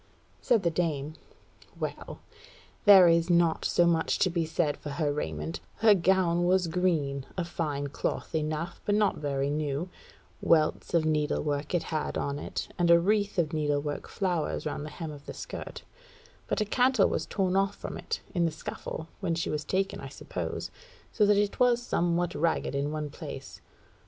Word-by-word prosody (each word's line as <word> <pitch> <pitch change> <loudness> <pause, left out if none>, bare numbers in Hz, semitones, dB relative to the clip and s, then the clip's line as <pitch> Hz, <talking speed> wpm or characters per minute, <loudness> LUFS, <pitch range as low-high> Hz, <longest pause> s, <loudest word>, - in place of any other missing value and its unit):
Said 235 -5 +2
the 170 - +2
dame: 155 -3 -1 0.7
"Well, - - -5 0.6
there 195 -4 +9
is 170 +1 +3
naught 170 -2 +3
so 175 - +3
much 165 -1 +2
to 185 - +2
be 165 -2 0
said 155 -2 0
for 150 - -7
her 145 0 -1
raiment: 80 - -4 0.2
her 220 -1 +6
gown 180 -2 +2
was 185 0 +3
green, 160 -6 0
of 175 -2 -1
fine 150 -5 -2
cloth 145 - -3
enough; 155 +2 -2
but 205 - +1
not 210 -1 +2
very 140 -1 -1
new: 150 +3 -2 0.5
welts 155 +1 +2
of 160 -2 +3
needle 155 -1 +1
work 145 +2 -2
it 175 - +1
had 155 -2 -2
on 140 0 -2
it, - - -4
and 175 -1 +3
a 170 0 +8
wreath 205 +3 +1
of 165 -3 +1
needle 145 -2 +1
work 145 0 -4
flowers 180 -5 -1
round 150 0 -3
the - - -6
hem 160 0 -6
of 145 -1 -12
the - - -6
skirt; - - -7 0.6
but - - 0
a - - +2
cantle 245 0 +3
was - - -2
torn 190 -2 0
off 195 +1 +2
from - - -6
it; - - -4
in 175 -3 +2
the 165 - +1
scuffle 160 +1 -6
when 170 -4 -1
she 165 - -2
was 150 0 -2
taken, 195 +3 -1
I - - -7
suppose, - - -5 0.4
so 210 -2 +3
that 205 -1 +5
it 205 0 0
was 245 -1 +4
somewhat 175 -6 0
ragged 160 +1 0
in 140 +1 -1
one 150 -1 -4
place. - - -8
165 Hz, 185 wpm, -28 LUFS, 150-185 Hz, 0.7 s, there